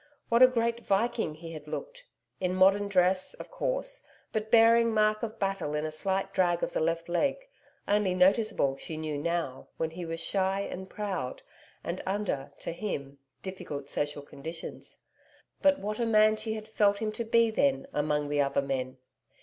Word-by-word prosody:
What 235 +1 +4
a 255 - +11
great 235 -2 0
Viking 200 -5 0
he 165 +1 -9
had 155 -2 -9
looked! - - -6 0.3
in 180 0 0
modern 195 +2 +5
dress, 185 - +2
of - - -10
course, - - -1 0.3
but 220 0 -2
bearing 230 0 +6
mark 215 0 +3
of 225 -1 -4
battle 195 -7 -1
in 150 +1 -1
a 155 - -3
slight 195 +4 -1
drag 175 -3 +2
of - - -1
the - - 0
left 165 +1 0
leg, 175 - +1 0.5
only 200 -3 +2
noticeable, 185 - +3
she 160 - -6
knew 155 -1 -3
now, 160 -3 -2
when 160 0 -1
he 175 +2 -6
was 165 0 -4
shy 195 +1 0
and 190 -1 -6
proud, 190 -12 -4 0.4
and 170 +2 -3
under, 190 -9 -2
to - - -3
him, 140 -7 -5 0.2
difficult 145 -7 -6
social 145 0 -1
conditions. 160 +4 -8 0.6
But 285 -1 +5
what 210 -2 -4
a 235 - +1
MAN 215 -1 +5
she 220 0 -2
had 215 -1 -6
felt 205 -2 +3
him 215 0 -2
to 235 - -3
be 230 0 +3
then, 270 +4 +2
among 150 0 0
the 145 0 +2
other 140 0 +1
men! 130 -1 -3
190 Hz, 180 wpm, -29 LUFS, 160-220 Hz, 0.6 s, a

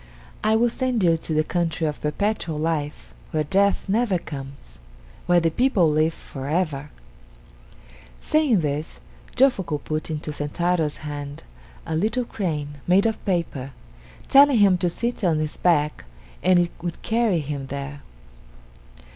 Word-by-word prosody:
I 215 +1 +3
will 235 +1 +3
send 250 -4 -1
you 165 -2 +5
to 160 0 -4
the 155 - +3
country 165 -1 -1
of 150 -1 -3
Perpetual 165 0 -1
Life, 150 - -3 0.2
where 155 -1 0
death 200 +7 +1
never 210 -1 +2
comes 135 - -9 0.5
where 175 0 +5
the 165 -1 +1
people 215 -4 +3
live 155 +2 +2
for 135 -1 -8
ever!" 150 -4 -1 1.3
Saying 290 - +2
this, 150 +1 -3 0.4
Jofuku 220 - +2
put 155 +1 -3
into 155 -1 -4
Sentaro's 155 +1 -1
hand 145 -1 -6 0.4
a 160 - -2
little 220 +8 0
crane 150 -9 -4
made 185 +4 +4
of 220 -1 -1
paper, 155 -8 -2 0.5
telling 280 -1 +7
him 200 -3 +5
to 175 - +1
sit 235 +6 -3
on 165 -4 +2
its 155 -1 -3
back 150 - +1 0.4
and 185 0 +4
it 175 -1 +2
would 175 -1 -5
carry 225 -5 +2
him 140 -2 -5
there. 140 +1 -6
165 Hz, 145 wpm, -23 LUFS, 150-200 Hz, 1.3 s, telling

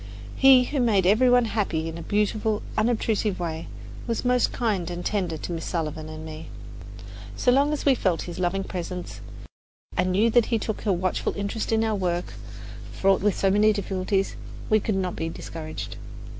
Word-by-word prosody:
He, 265 -2 +7
who 280 +3 -2
made 215 -7 +3
every 220 +7 +5
one 245 -1 +5
happy 195 -8 -1
in 165 - -5
a 170 - -6
beautiful, 210 +2 0
unobtrusive 215 -2 0
way, 165 -2 -4 0.4
was 230 +1 -2
most 250 0 +3
kind 200 -8 -1
and 175 0 -5
tender 180 -6 -1
to 165 - -6
Miss 165 -1 -4
Sullivan 155 -2 -3
and 155 0 -8
me. 155 0 -8 0.9
So 245 - +2
long 280 +3 +3
as 300 - -3
we 280 - +6
felt 185 -9 0
his 175 0 -7
loving 185 +2 0
presence 180 -1 -6 0.7
and 185 - +1
knew 215 +5 +3
that 240 -1 +4
he 230 - +1
took 220 0 -4
a - - +4
watchful 185 0 -1
interest 205 +3 -3
in 225 0 +2
our 220 -1 +1
work, 180 -3 -2 0.6
fraught 195 0 +2
with 205 0 +1
so 195 - +2
many 210 +2 +5
difficulties, 195 -1 -1 0.4
we 215 - +6
could 215 0 -1
not 185 -2 -1
be 165 - -3
discouraged. 160 -1 -7
195 Hz, 185 wpm, -25 LUFS, 175-220 Hz, 0.9 s, He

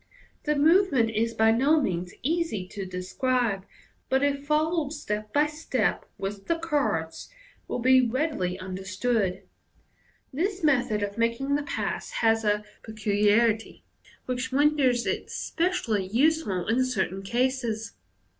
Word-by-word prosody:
The 300 0 +1
movement 295 - +4
is 230 +1 -1
by 220 0 +4
no 275 +7 +4
means 180 - -2
easy 310 - -1
to 195 -2 -6
describe, 195 +3 -1 0.4
but 265 +1 +2
if 285 0 0
followed 310 0 +1
step 210 -7 -4
by 295 +1 +3
step 300 -7 -1
with 195 0 -5
the 335 - +1
cards, 255 - -2 0.4
will - - -2
be 260 +1 +5
readily 240 - -1
understood. 190 +2 -2 0.9
This 375 +6 -2
method 245 -8 +2
of 200 +2 -4
making 230 +5 0
the 290 - +2
pass 290 - -3 0.2
has 225 0 +3
a 210 0 +1 0.2
peculiarity 215 +1 +1 0.4
which 255 0 -3
renders 275 -3 +3
it - - -2
specially 290 - -1
useful 235 - +1
in 240 +3 +2
certain 220 -7 -1
cases. 235 0 -1
240 Hz, 125 wpm, -26 LUFS, 210-290 Hz, 0.9 s, be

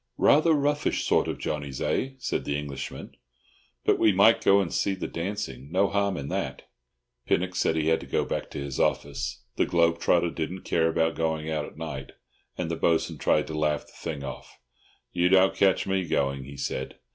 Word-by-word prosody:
"Rather 155 +2 +5
roughish 145 0 +1
sort - - +2
of - - -3
Johnnies, 70 -3 -4
eh?" 135 +1 -1
said 130 - -2
the 70 - -1
Englishman. 70 -2 -6 0.7
"But - - +3
we 110 - +5
might 100 +4 +5
go 100 0 +6
and 95 -4 -1
see 100 - +1
the 95 - -5
dancing—no 85 -1 -2
harm 100 -2 0
in 70 - -5
that." - - -3 0.6
Pinnock 90 +1 +1
said 80 - +1
he 80 0 +1
had 80 - +3
to 70 - -10
go - - 0
back - - -3
to - - -8
his 70 -1 -4
office; - - -1
the - - +3
globe 85 -1 +2
trotter 85 0 +2
didn't 85 +4 -4
care 80 -1 +2
about 80 0 +1
going 80 -1 -2
out 75 -2 -1
at - - -13
night; 70 -5 -6 0.4
and 85 -2 -2
the - - -1
Bo'sun 80 0 +1
tried 75 - +2
to 80 - -7
laugh 75 -1 0
the - - -20
thing 75 -4 -5
off. 70 - -8 0.5
"You 90 0 +2
don't 95 0 +5
catch 95 -1 +3
me 95 -2 -1
going," 70 -3 0
he 70 +1 -10
said. 65 -1 -4
80 Hz, 195 wpm, -27 LUFS, 75-95 Hz, 0.7 s, go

